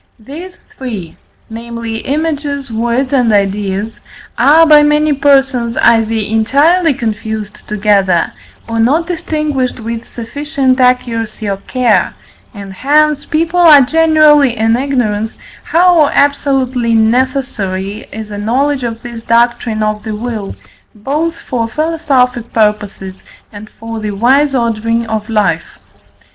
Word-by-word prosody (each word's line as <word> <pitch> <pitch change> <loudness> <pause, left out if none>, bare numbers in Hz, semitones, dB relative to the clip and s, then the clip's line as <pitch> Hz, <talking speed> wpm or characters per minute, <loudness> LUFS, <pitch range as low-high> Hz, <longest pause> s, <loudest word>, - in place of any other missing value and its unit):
These 310 +11 -10 0.2
three 215 -11 -7 0.3
namely, 230 0 -6
images, 285 -2 -3
words, 240 +4 -1
and 245 -4 +2
ideas 200 +1 -1 0.3
are 300 +7 +5
by 300 -2 +6
many 300 0 +2
persons 270 -4 +1
either 225 -1 +3
entirely 275 - +2
confused 220 -2 -5
together, 200 -4 +1 0.3
or 230 0 -3
not 285 +9 +2
distinguished 305 -7 -2
with 230 +1 -6
sufficient 270 +2 -2
accuracy 230 -4 0
or 195 -1 -2
care, 245 +4 0 0.4
and 200 -3 -10
hence 295 +5 +1
people 330 +3 0
are 310 -5 +8
generally 300 -3 +4
in 225 +1 +2
ignorance, 235 -5 -2 0.3
how 340 -2 +4
absolutely 270 -5 +1
necessary 220 -4 -1
is 220 -1 -8
a 205 - -6
knowledge 260 +6 0
of 230 -1 -5
this 235 -1 -8
doctrine 230 -2 +1
of 215 0 -2
the 215 0 -5
will, 215 - -5 0.4
both 305 +10 -3
for 235 -4 -2
philosophic 270 -5 -1
purposes 210 -3 -2 0.3
and 210 +1 -10
for 225 0 -6
the 215 -1 -4
wise 265 +7 +2
ordering 230 -1 -1
of 220 0 -4
life. 200 -7 -1
235 Hz, 120 wpm, -13 LUFS, 220-285 Hz, 0.4 s, are